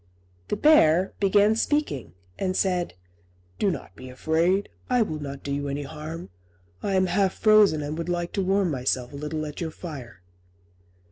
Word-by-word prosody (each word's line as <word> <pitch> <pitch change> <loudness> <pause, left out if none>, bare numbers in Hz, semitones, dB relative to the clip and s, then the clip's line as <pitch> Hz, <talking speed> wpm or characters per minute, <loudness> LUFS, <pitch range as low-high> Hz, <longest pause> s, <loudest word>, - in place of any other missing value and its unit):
The - - -1
bear 190 - +5
began 205 +2 +4
speaking, 150 - -1 0.3
and 185 -1 -1
said, 180 - 0 0.6
"Do 200 - +3
not 180 - -5
be 130 0 -10
afraid: 165 +9 +1 0.2
I 250 -2 +4
will 155 -7 -4
not 140 -1 -7
do 140 - -4
you 145 0 -2
any 140 +1 -3
harm; 155 - -7 0.5
I 195 - -1
am 185 0 +4
half 190 +1 +1
frozen, 210 -8 +5
and 145 +1 -4
would 170 - -3
like 175 0 -2
to 200 - 0
warm 190 -1 +1
myself 130 -1 -1
a - - -7
little 150 +2 -4
at 150 +2 -7
your 165 - -2
fire." 135 - -9
170 Hz, 175 wpm, -25 LUFS, 145-195 Hz, 0.6 s, bear